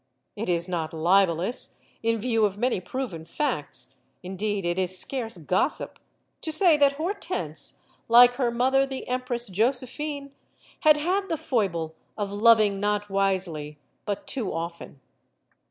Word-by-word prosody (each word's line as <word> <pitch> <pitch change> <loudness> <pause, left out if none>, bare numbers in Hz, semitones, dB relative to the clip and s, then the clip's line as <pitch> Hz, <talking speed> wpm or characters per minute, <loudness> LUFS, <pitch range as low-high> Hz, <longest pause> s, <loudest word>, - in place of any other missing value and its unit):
It 210 -1 -4
is 170 0 +1
not 165 -3 -3
libelous, 180 +5 +3 0.2
in 230 0 +1
view 225 0 0
of 200 -1 +1
many 245 -1 0
proven 195 -6 -5
facts 155 - -3 0.3
indeed, 195 +1 -3
it 175 +2 0
is 185 0 +1
scarce 230 -5 -2
gossip 180 - -1 0.4
to 320 - -2
say 340 0 +5
that 285 -1 +4
Hortense, 310 - -2 0.2
like 240 +1 +8
her 250 -3 +1
mother, 260 +3 +2
the 265 -1 -6
Empress 250 -1 -1
Josephine, 270 +7 -2 0.5
had 305 -3 +5
had 380 +6 -1
the 325 - -1
foible 195 - -1 0.2
of 205 -2 -3
loving 210 -1 +4
not 205 0 -1
wisely, 185 -7 -1 0.3
but 210 +9 -3
too 265 -7 -3
often. 170 -3 -6
215 Hz, 140 wpm, -26 LUFS, 180-265 Hz, 0.5 s, like